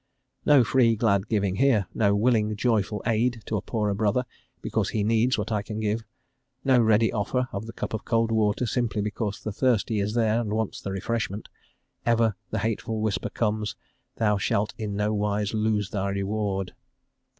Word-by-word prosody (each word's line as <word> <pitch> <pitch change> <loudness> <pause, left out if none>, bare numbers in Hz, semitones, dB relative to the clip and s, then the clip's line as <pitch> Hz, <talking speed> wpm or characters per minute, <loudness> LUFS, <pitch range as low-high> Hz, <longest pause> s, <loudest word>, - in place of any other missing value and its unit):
"* 130 0 -45
No 140 -4 +7
free, 115 -1 +3
glad 100 -2 +1
giving 100 -4 0
here; 125 -7 +3
no 100 -2 +2
willing, 110 -1 +2
joyful 105 -2 0
aid 115 +1 +1
to 110 - -2
a 100 - -1
poorer 105 -3 -1
brother, 110 +5 +1 0.3
because - - -1
he 105 - -1
needs 115 +4 +2
what 105 +1 -3
I 105 -2 +1
can 105 +2 -6
give; 110 +1 -1 0.6
no 130 -2 +4
ready 110 -1 +3
offer 125 +5 0
of 100 +2 -4
the - - -6
cup 115 - -5
of 110 - -3
cold 115 -1 +1
water, 110 +1 +1
simply 115 -3 -1
because 105 -1 -3
the 110 - -3
thirsty 115 -1 +1
is 105 +2 -1
there 115 0 +2
and 105 -3 -3
wants 110 -1 -2
the - - -5
refreshment; 105 +1 -3 0.5
ever 115 -3 +2
the 110 - -2
hateful 110 +1 -2
whisper 110 -1 -1
comes: 105 -1 -1 0.4
"thou 105 -2 +1
shalt 105 +1 0
in 105 -2 -4
no 105 +1 0
wise 105 0 -1
lose 105 -2 0
thy 100 -1 -1
reward." 100 -1 -2
110 Hz, 185 wpm, -26 LUFS, 105-115 Hz, 0.6 s, No